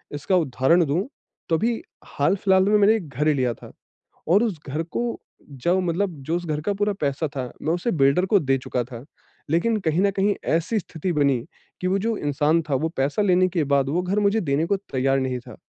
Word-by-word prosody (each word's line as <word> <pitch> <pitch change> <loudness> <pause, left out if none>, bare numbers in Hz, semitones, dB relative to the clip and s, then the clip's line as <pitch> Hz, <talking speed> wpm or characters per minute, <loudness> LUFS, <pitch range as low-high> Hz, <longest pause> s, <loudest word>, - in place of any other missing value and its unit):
इसका 145 +6 0
उदाहरण 160 +2 +3
दूँ 160 - -1 0.4
तो 165 - +3
अभी 230 +5 -1 0.2
हाल-फ़िलहाल 190 +5 +2
में 210 - +5
मैंने 210 +2 +5
1 220 - -3
एक 155 - -12
घर 150 - +1
ही 155 - +4
लिया 130 -4 0
था - - -13 0.6
और 205 +5 +5
उस 200 -9 -2
घर 150 +4 -2
को 235 +8 -3 0.3
जब 170 +8 0
मतलब 180 +3 0
जो 165 +5 -1
उस 175 - -3
घर 155 -2 -2
का 205 +5 -1
पूरा 205 +1 0
पैसा 145 +2 0
था 130 - -2 0.2
मैं 160 +2 0
उसे 180 +7 -1
बिल्डर 140 +3 +3
को 200 +1 +3
दे 135 -4 +1
चुका 125 -1 -3
था। 120 0 -10 0.5
लेकिन 215 +8 +2
कहीं 160 +1 +1
न 200 0 +3
कहीं 200 +1 +1 0.2
ऐसी 205 +7 0
स्थिति 170 +1 -4
बनी 140 -4 +2 0.4
कि 185 - 0
वो 190 - +2
जो 225 +2 -1
इंसान 150 +3 +1
था 140 - +2
वो 160 - +1
पैसा 140 +9 0
लेने 185 -2 +3
के 170 -3 0
बाद 135 -1 +2
वो 170 +5 0
घर 185 +3 0
मुझे 205 +2 +2
देने 145 0 0
को 200 +4 +1
तैयार 135 +1 +1
नहीं 130 -1 -2
था। 120 - -12
165 Hz, 225 wpm, -23 LUFS, 140-195 Hz, 0.6 s, में